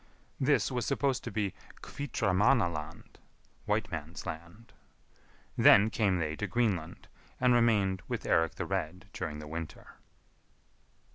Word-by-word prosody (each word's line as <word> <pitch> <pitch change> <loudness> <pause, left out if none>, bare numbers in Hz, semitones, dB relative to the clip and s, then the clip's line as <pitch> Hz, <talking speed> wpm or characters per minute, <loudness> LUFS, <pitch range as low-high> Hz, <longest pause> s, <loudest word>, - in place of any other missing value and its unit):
This 140 0 +2
was 125 -2 -1
supposed 140 -2 0
to - - -4
be 100 -4 -1 0.3
Hvitramannaland 95 - 0 0.5
(whiteman's 90 -7 -3
land). 85 +8 -8 0.8
Then 105 +2 +6
came 100 -5 +1
they 80 -2 -2
to 105 - -2
Greenland, 95 -10 -1 0.3
and 125 -1 +4
remained 105 -6 +3
with - - -3
Eirik 80 0 +2
the - - -3
Red 90 +5 -4
during 80 -4 -4
the 75 0 -8
winter. 80 0 -7
95 Hz, 120 wpm, -31 LUFS, 80-115 Hz, 0.8 s, Then